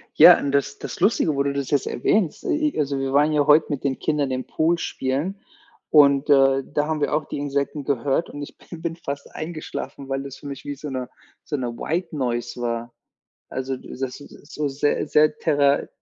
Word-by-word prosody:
Ja, - - +10
und 140 - -2
das 140 -1 0
das - - -6
Lustige, 175 -5 +2
wo 140 - +2
du 140 0 -1
das 140 -1 -3
jetzt 145 -2 +1
erwähnst, 175 - 0
i 305 -1 0
i - - -2
also, 140 -2 0
wir 135 0 -2
waren 145 +2 +4
ja 150 -1 +2
heute 150 +1 +6
mit 145 -3 -3
den 135 -2 -1
Kindern 145 -3 0
im 130 0 -2
Pool 165 +2 +1
spielen 145 +4 -2 0.6
und, 140 -1 +5
äh, 135 -1 +5
da 150 0 +1
haben 155 -1 -2
wir - - 0
auch 150 +1 +1
die - - -5
Insekten 140 +1 -2
gehört 140 +3 0
und 145 - -8
ich 145 - -9
bin 170 -2 -11
bin 165 -1 -3
fast 140 -4 -7
eingeschlafen, 155 -3 -6
weil 135 0 -2
das 140 -1 -8
für 145 - -10
mich 140 -2 -7
wie 145 - -4
so 150 +2 -7
'ne 130 -2 -4 0.3
so 150 - -3
'ne 125 -2 -2
White 170 +1 -2
Noise 120 -3 -2
war. 120 0 -3 0.6
Also, 130 0 -3
die - - -14
das 130 +1 -5
ist 145 +1 -14
so 150 -1 -1
sehr 145 +2 0
sehr 150 +1 +4
thera 145 -2 +2
140 Hz, 215 wpm, -23 LUFS, 135-150 Hz, 0.6 s, Ja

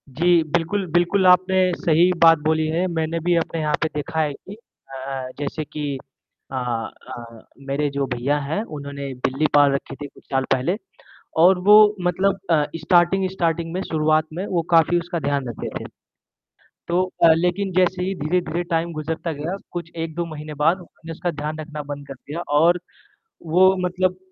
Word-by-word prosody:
जी, 170 +5 +3
बिल्कुल, 170 +5 -1
बिल्कुल, 175 +3 +2
आपने 185 0 +4
सही 170 +2 +4
बात 165 0 +8
बोली 155 0 +1
है, 165 +3 0
मैंने 165 -1 -2
भी 175 -1 +3
अपने 165 0 -2
यहाँ 150 -1 0
पे 160 - +2
देखा 150 +2 -3
है 150 -2 -1
कि 195 +8 -11
अ 220 -10 -21
अ, 135 0 -5
जैसे 145 +2 -3
कि 145 -2 -4 0.5
अ - - -5
अ, 120 -1 -6 0.2
मेरे 145 +2 0
जो 140 0 -1
भैया 140 +5 0
हैं, 150 +8 -2
उन्होंने 140 -6 -7
बिल्ली 135 +4 0
पाल 145 -1 +6
रखी 140 0 -3
थी 145 +1 -7
कुछ - - -20
साल 135 0 +1
पहले 135 +8 0 0.7
और 185 +1 +6
वो 210 0 +8
मतलब 190 +2 +1
अ, 150 -3 +4
स्टार्टिंग 175 +3 +3
स्टार्टिंग 170 -3 -1
में 185 - -2
शुरुआत 155 0 +2
में 180 +4 -4
वो 175 -2 0
काफ़ी 165 +2 +4
उसका 170 0 -4
ध्यान 140 -3 -1
रखते 115 - -5
थे। - - -8 1.0
तो 175 +2 +2 0.2
अ, 165 -1 +8
लेकिन 180 +4 0
जैसे 180 0 +2
ही 190 +1 -2
धीरे-धीरे 175 +1 -1
टाइम 165 +1 0
गुज़रता 160 +2 -3
गया, 155 +6 -4
कुछ 170 -1 -6
1-2 165 +1 -3
महीने 155 -1 -8
बाद 165 +4 +4
उन्होंने 165 -2 -12
उसका 175 +2 -3
ध्यान 155 +1 -4
रखना 155 -1 -6
बंद 145 0 -7
कर 135 - -6
दिया 145 +5 -7 0.2
और 175 +3 +4 0.7
वो 185 +4 +5
मतलब 185 0 0
165 Hz, 180 wpm, -22 LUFS, 145-180 Hz, 1.0 s, बात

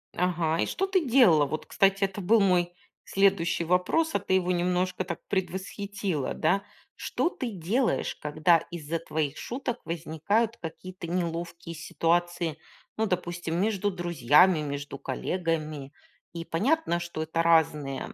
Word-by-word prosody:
Ага, 170 -3 0
и - - +2
что 385 - -1
ты 375 -4 +1
делала? 230 - +5
Вот, 155 +2 -4
кстати, 195 0 +2
это 195 +1 -1
был 215 +4 +4
мой 180 -2 +2 0.3
следующий 170 -4 +2
вопрос, 180 - +1
а - - +2
ты - - -2
его 180 -1 +2
немножко 180 +1 0
так 175 -2 -5
предвосхитила, 190 -3 -2
да. 195 +5 +1 0.3
Что - - -1
ты 255 -8 -4
делаешь, 205 +7 0
когда 155 +3 +3
из-за 165 -1 -4
твоих 155 -3 -2
шуток 245 -1 -4
возникают 170 +8 -1
какие-то 175 +2 -8
неловкие 170 -1 -3
ситуации? 170 0 0 0.4
Ну, 220 - +1
допустим, 175 -2 -2
между 205 0 +1
друзьями, 175 -1 +4
между 145 -1 -5
коллегами, 155 -1 -3 0.4
и 165 -1 -6
понятно, 220 - +1
что 170 -2 -4
это 160 +1 -1
разные 150 -4 +1
175 Hz, 135 wpm, -27 LUFS, 160-195 Hz, 0.4 s, делала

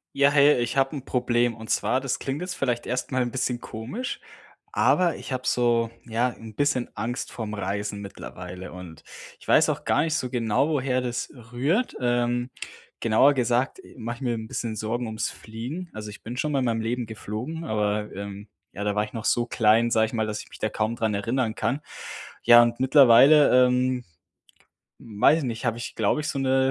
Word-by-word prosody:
Ja, 140 0 +5
hey. 145 -1 +5
Ich 120 +3 -2
habe 135 +3 +2
'n 135 -2 -7
Problem. 120 -2 +1
Und 110 -1 -11
zwar, 130 - +1
das 135 -1 -2
klingt 135 +3 -3
jetzt 180 0 -4
vielleicht 125 -6 -1
erst 125 +2 -3
mal 130 - +1
'n 120 -1 -1
bisschen 125 -1 -1
komisch, 125 - -5 0.5
aber 175 -3 +3
ich - - -9
habe 130 0 -3
so, 120 -2 +2 0.2
ja, 115 +2 0
'n 110 -2 -11
bisschen 145 -2 0
Angst 120 +2 -4
vorm 110 -3 -5
Reisen 100 +1 -3
mittlerweile 90 -2 -8
und 90 -3 -10 0.4
ich - - -17
weiß - - +5
auch - - -2
gar - - +3
nicht 160 -1 0
so 125 - -2
genau, 120 +3 +1
woher 130 -4 0
das 125 -1 -3 0.2
rührt. 155 - 0
Ähm, 120 0 0 0.5
genauer 115 +6 +4
gesagt 125 - 0
e - - -16
mache 120 0 -5
ich - - -17
mir 125 -3 0
'n 110 -1 -6
bisschen 110 0 -4
Sorgen 115 +3 -2
um's 110 0 -2
Fliegen. 125 +11 -7
Also 105 -1 -7
ich 105 - -11
bin 120 +3 -6
schon 150 +4 -1
mal 140 - +2
in 130 - 0
meinem 115 -2 0
Leben 120 +2 -2
geflogen, 110 +9 -6
aber, 105 -3 -1
ähm, 100 +1 -7 0.2
ja, 100 - -6
da 105 0 -1
war 105 - +2
ich 105 - -8
noch 115 -1 -5
so 120 -1 +2
klein- 115 0 +3
sage 110 0 +4
ich - - -10
mal- 110 -2 0
dass 105 -1 -4
ich - - -15
mich - - -13
da 110 - 0
kaum 110 +2 -1
dran 110 -2 -1
erinnern 115 +3 -1
kann. 120 +7 -1 0.6
Ja, 120 0 +8
und 120 0 -1
mittlerweile, 130 0 +7
ähm, 125 0 0 1.0
weiß 110 +8 +3
ich 155 - -3
nicht 120 -1 -4
habe 115 -2 0
ich, 120 - -6
glaube 110 +7 +1
ich 155 - -3
so 140 - -2
'ne 130 0 +2
120 Hz, 210 wpm, -25 LUFS, 110-130 Hz, 1.0 s, Ja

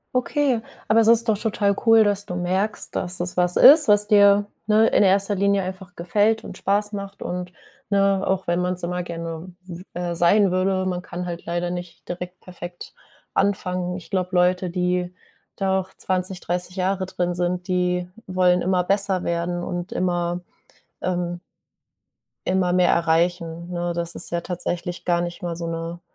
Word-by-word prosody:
Okay, 255 -2 +1 0.3
aber 225 +1 +4
es 220 - +4
ist 230 0 +5
doch 210 -2 +2
total 205 -3 +1
cool, 225 -1 +7
dass 205 0 0
du 180 - -4
merkst, 185 +4 -2
dass 180 0 -1
es 175 +1 -2
was 180 0 +2
ist, 300 0 +9
was 210 0 +4
dir, 205 -1 +5 0.2
ne, 215 +1 +5
in - - +3
erster 200 +1 +3
Linie 200 0 +2
einfach 185 -1 -8
gefällt 210 +5 +1
und - - -8
Spaß 205 +1 0
macht 200 -1 -7
und 180 0 -4 0.4
ne, 195 -1 +3
auch 190 0 0
wenn 175 +1 0
man's 180 0 -2
immer 180 +1 -2
gerne 165 0 -6
w 180 -1 -9
äh, 175 -1 -2
sein 180 +3 +4
würde, 185 +1 +1
man 180 -1 -2
kann 180 0 -6
halt 175 -1 -6
leider 175 +1 -2
nicht 175 -1 -8
direkt 180 +1 -6
perfekt 175 -1 -10 0.4
anfangen. 180 -2 0
Ich 185 - -13
glaube, 185 -2 0
Leute, 180 +1 +2
die 180 0 -1 0.4
da 190 -1 +1
auch 185 - -7
20, 185 0 -2
30 180 +1 -3
Jahre 190 0 -1
drin 175 -1 -2
sind, 180 +1 -2
die 180 -1 0 0.2
wollen 180 -1 +3
immer 180 0 +1
besser 195 -1 +1
werden 170 +1 -2
und 175 +1 -4
immer, 175 -1 -1 0.6
ähm 175 -1 -2 1.1
immer 180 -1 +1
mehr 180 -1 +4
erreichen, 170 +1 0
ne? 175 0 -2
Das 170 0 -3
ist - - -2
ja 170 0 -2
tatsächlich 175 0 -4
gar 175 -1 +2
nicht 175 +3 -5
mal 170 -1 -3
so 170 - -5
'ne 165 +1 -5
180 Hz, 175 wpm, -23 LUFS, 175-195 Hz, 1.1 s, ist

